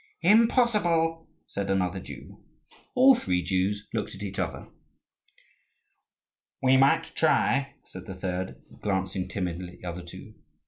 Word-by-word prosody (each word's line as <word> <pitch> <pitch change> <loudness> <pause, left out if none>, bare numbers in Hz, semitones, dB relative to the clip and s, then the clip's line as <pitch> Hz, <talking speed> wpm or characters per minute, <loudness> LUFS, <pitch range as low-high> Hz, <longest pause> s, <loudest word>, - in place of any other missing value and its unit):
"Impossible," 190 -6 +3 0.2
said 100 -1 -4
another 95 -1 0
Jew. - - -11 0.6
All 265 +2 +8
three 90 - 0
Jews 95 +3 -1
looked 110 -3 -3
at 100 - -8
each 100 - -5
other. - - -3 2.0
"We 130 0 +5
might 150 +5 +3
try," 140 -3 +2
said 95 0 -11
the 95 - -6
third, 95 0 -4 0.2
glancing 95 -2 -1
timidly 90 -2 -4
at - - -18
the 90 - -8
other 85 +1 -5
two. 85 0 -11
100 Hz, 130 wpm, -27 LUFS, -, 2.0 s, All